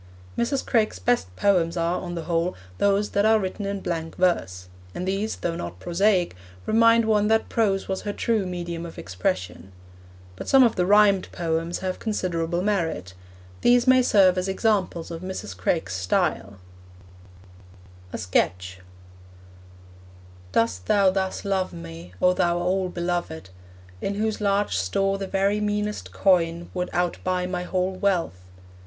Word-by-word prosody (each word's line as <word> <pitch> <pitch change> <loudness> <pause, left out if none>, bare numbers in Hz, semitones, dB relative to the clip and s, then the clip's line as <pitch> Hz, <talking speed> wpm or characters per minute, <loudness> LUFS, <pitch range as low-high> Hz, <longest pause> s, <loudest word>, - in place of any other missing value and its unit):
Mrs. 265 +3 -1
Craik's 220 - +1
best 90 -1 0
poems 175 - +2
are, 170 +1 0
on 175 -1 -5
the 165 - -4
whole, 170 +2 -1 0.2
those 200 +1 +2
that 200 - +2
are 220 +1 +5
written 195 0 -3
in 200 -1 -3
blank 165 -2 -4
verse; 90 - 0 0.3
and 180 - -4
these, 200 +3 -1
though 170 -1 -3
not 85 - -6
prosaic, 180 - +1 0.3
remind 230 +1 +4
one 210 -1 +2
that 220 +1 +2
prose 200 -4 +1
was 190 -1 -2
her 205 - -3
true 215 -2 0
medium 170 -2 -5
of 170 - -9
expression. 95 0 -3 0.6
But - - -8
some 270 -1 +6
of 235 -2 +3
the 180 -1 +1
rhymed 205 -1 +4
poems 165 0 -2
have 185 0 -3
considerable 175 -5 -2
merit. 165 - -1 0.5
These 245 0 +4
may 255 0 +6
serve 190 -6 +4
as 185 - -2
examples 190 -4 0
of 165 0 -6
Mrs. 185 - -6
Craik's 95 +1 -1
style: 95 +1 -1 1.5
A - - -4
SKETCH 90 +1 -1 1.7
Dost 90 -4 0
thou 200 -2 +4
thus 190 +1 -2
love 190 -2 -1
me, 85 +1 -10
O 180 - +4
thou 175 -1 +1
all 185 +1 0
beloved, 170 - -3 0.5
In 200 - -2
whose 215 +1 -1
large 200 - +1
store 195 - 0
the 195 - -4
very 195 +2 +1
meanest 210 0 -2
coin 170 -3 +1
Would 180 -1 -2
out 175 -1 -1
buy 180 -1 0
my 180 0 -3
whole 185 +1 -1
wealth? 180 - -1
180 Hz, 150 wpm, -24 LUFS, 165-200 Hz, 1.7 s, some